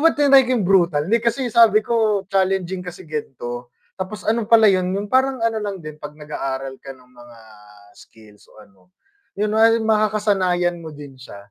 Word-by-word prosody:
ba 330 - +6
tinry 275 -2 +5
ko 250 - -5
yung 200 -6 -1
brutal 175 -6 +2
hindi 230 - +3
kasi 245 +2 -1
sabi 225 -2 +5
ko 215 -3 0
challenging 190 -1 -1
kasi 180 +1 -10
gan'to 120 -5 -6 0.3
tapos 190 +3 -6
ano 220 -1 -1
pala 225 -1 +6
yun, 185 -2 +2
yung 205 +2 -6
parang 260 -2 +1
ano 225 -1 0
lang 200 -2 -4
din 155 0 -10
'pag 150 0 -9
nag-aaral 135 -3 -6
ka 135 - -9
ng 125 0 -23
mga 120 -1 -16 0.5
skills 105 -2 -19
o - - -22
ano, 95 -2 -27 0.6
yun 210 +1 -1
nga 220 +1 +5
makakasanayan 205 -5 0
mo 165 - -9
din 145 -3 -12
siya, 125 - -12
190 Hz, 185 wpm, -20 LUFS, 150-220 Hz, 0.6 s, ba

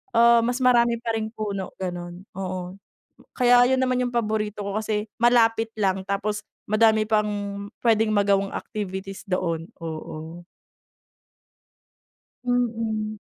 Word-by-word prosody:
ah, 235 0 +7
mas 245 +3 0
marami 235 -1 +4
pa 230 - -1
ring 220 -1 -1
puno 200 -3 -4
gano'n. 175 0 -6 0.2
Oo, 185 0 -5 0.6
kaya 245 -1 +6
'yun 260 0 +2
naman, 255 -1 +1
'yung 245 -1 -3
paborito 215 -2 -1
ko 200 +1 -3
kasi 215 0 -2
malapit 225 -1 +4
lang, 195 -3 0
tapos 210 +2 -2 0.2
madami 215 0 +4
pang 210 -1 +2 0.6
puwedeng 220 -2 +3
magawang 200 -1 +2
activities 195 -2 -5
doon, 170 -3 -1 0.2
oo. 160 +1 -7 2.0
Mm. 225 -3 -1
215 Hz, 115 wpm, -24 LUFS, 190-230 Hz, 2.0 s, ah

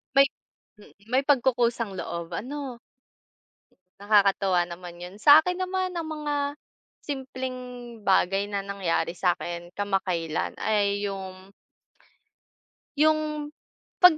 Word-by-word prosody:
May 275 0 +8 0.5
mm, - - -17 0.2
may 265 +2 +3
pagkukusang 240 -5 +2
loob 170 0 -4
ano? 255 - -5 1.2
Nakakatuwa 195 -3 +3
naman 175 0 -8
yun. 180 +2 -8
Sa 290 +7 +8
akin 360 +2 -2
naman 370 0 -1
ang 330 - -2
mga 300 -2 -3 0.7
simpleng 260 -2 -4 0.5
bagay 195 +1 +3
na 200 -1 -1
nangyari 185 -3 -1
sa 180 -2 +3
akin 175 0 -7
kamakailan 185 -5 -1
ay 205 -1 +1
yung 190 -1 -8 1.5
yung 305 -1 +1 0.5
kapag 360 -4 +8
205 Hz, 105 wpm, -26 LUFS, 185-290 Hz, 1.5 s, May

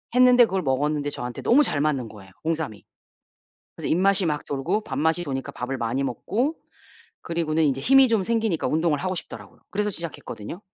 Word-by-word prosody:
했는데 250 -1 +7
그걸 190 -3 -1
먹었는데 145 +2 0
저한테 125 -3 -5
너무 280 +5 +5
잘 145 - +1
맞는 140 -5 0
거예요 95 -3 -14
홍삼이. 160 -10 -2 0.9
그래서 - - -4
입맛이 190 +2 +3
막 150 -2 -1
돌고 165 +10 -1
밥맛이 160 +5 0
도니까 135 -3 -4
밥을 130 +2 -4
많이 115 +4 -1
먹고 245 - -1 0.7
그리고는 160 -1 0
인제 135 -2 +1
힘이 270 - +6
좀 225 -4 +2
생기니까 225 -5 0
운동을 160 -1 +1
하고 185 +3 -2
싶더라고요. 175 - -9
그래서 210 +2 -1
시작했거든요. 170 - -7
160 Hz, 425 characters per minute, -24 LUFS, 135-200 Hz, 0.9 s, 했는데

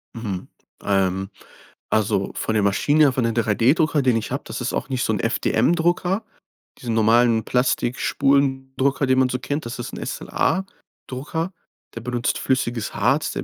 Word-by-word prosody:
Mhm, 105 -6 -5 0.4
ähm, 95 -1 0 0.6
also 100 -2 +1
von 110 - -2
der 105 - +2
Maschine 145 +10 +3
her, 140 - +4
von 125 - 0
den 115 -1 0
3D-Drucker, 130 - +2
den 125 -3 +3
ich 110 - -4
habe - - -3
das - - -6
ist - - -2
auch - - -3
nicht 130 -2 -1
so 110 - +1
'n 105 - -1
FDM-Drucker. 175 - +1 0.6
Diese 120 - -4
normalen 115 +1 +4
Plastikspulendrucker, 135 +2 +1
den 130 0 +3
man 130 -1 +3
so 125 - -2
kennt, 145 +3 -3
das 115 - -6
ist 120 - -6
'n - - -6
SLA-Drucker. 165 -3 -3 0.4
Der 115 - -5
benutzt 120 0 -1
flüssiges 120 -4 -1
Harz, 135 +9 +1
der - - -4
125 Hz, 160 wpm, -22 LUFS, 115-140 Hz, 0.6 s, her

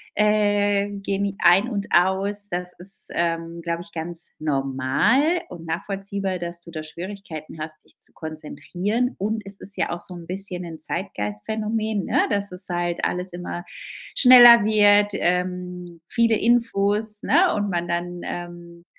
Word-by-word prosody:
äh, 205 -1 +2
gehen 200 0 -2
die 200 -1 -2
ein 185 +6 +5
und 205 -3 -3
aus. 195 +3 +2
Das 180 0 -3
ist, 190 +2 -10
ähm, 170 0 -2
glaube 170 0 -2
ich, 170 - -13
ganz 170 +1 -5
normal 150 - +1
und 165 -2 -9
nachvollziehbar, 195 +2 -3
dass 170 0 -6
du 170 - -14
da 155 -2 -6
Schwierigkeiten 165 -2 -8
hast, 155 0 -7
dich - - -27
zu - - -15
konzentrieren. 180 - -3
Und 215 +3 -2
es 200 0 -10
ist 195 - -9
ja - - -1
auch 175 - -4
so 180 - -11
'n 170 -1 -10
bisschen 185 -1 -5
'n 160 -2 -8
Zeitgeistphänomen, 210 - -3
ne, - - +2
dass 200 -1 -1
es 180 +1 -8
halt 175 -1 -2
alles 180 0 -2
immer 175 0 -6 0.5
schneller 240 -3 +9
wird, 205 -1 +5
ähm, 180 -1 -2
viele 230 -2 +3
Infos, 215 -2 +1
ne, 360 +1 +4
und 205 -2 -1
man 175 0 -1
dann, 175 +1 -3
ähm, 175 0 -8
185 Hz, 155 wpm, -23 LUFS, 170-205 Hz, 0.5 s, schneller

